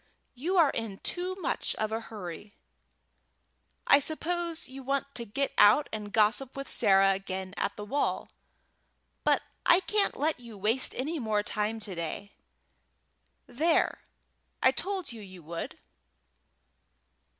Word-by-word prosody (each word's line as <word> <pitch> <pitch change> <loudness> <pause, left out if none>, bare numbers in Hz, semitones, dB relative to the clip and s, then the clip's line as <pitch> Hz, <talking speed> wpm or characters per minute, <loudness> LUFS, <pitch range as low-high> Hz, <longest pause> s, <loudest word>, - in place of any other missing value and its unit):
"You 335 +10 -1
are 320 -5 +6
in 225 -4 -4
too 365 +1 -2
much 380 - -1
of 215 0 -2
a 225 - -1
hurry. 205 -2 -8 1.3
I 280 - +7
suppose 335 +3 -1
you 265 +1 -9
want 275 +1 -2
to 235 - -3
get 275 +6 -2
out 210 +9 +7
and 210 -1 -5
gossip 220 +5 +2
with 275 - -5
Sarah 195 -3 +5
again 190 0 -4
at 200 - -2
the 210 - -7
wall, 280 +7 -1 0.9
but - - +3 0.2
I 345 - +6
can't 415 +1 +1
let 300 0 0
you 235 -3 -11
waste 220 +6 +1
any 305 +5 -2
more 215 -4 0
time 210 +2 -1
to 205 -2 -4
day. 170 +4 -5 1.1
There, 320 +6 +1 0.6
I - - +7
told 385 -7 -3
you 230 -2 -9
you 185 -4 -12
would!" 165 +2 -6
230 Hz, 140 wpm, -29 LUFS, 205-295 Hz, 1.3 s, I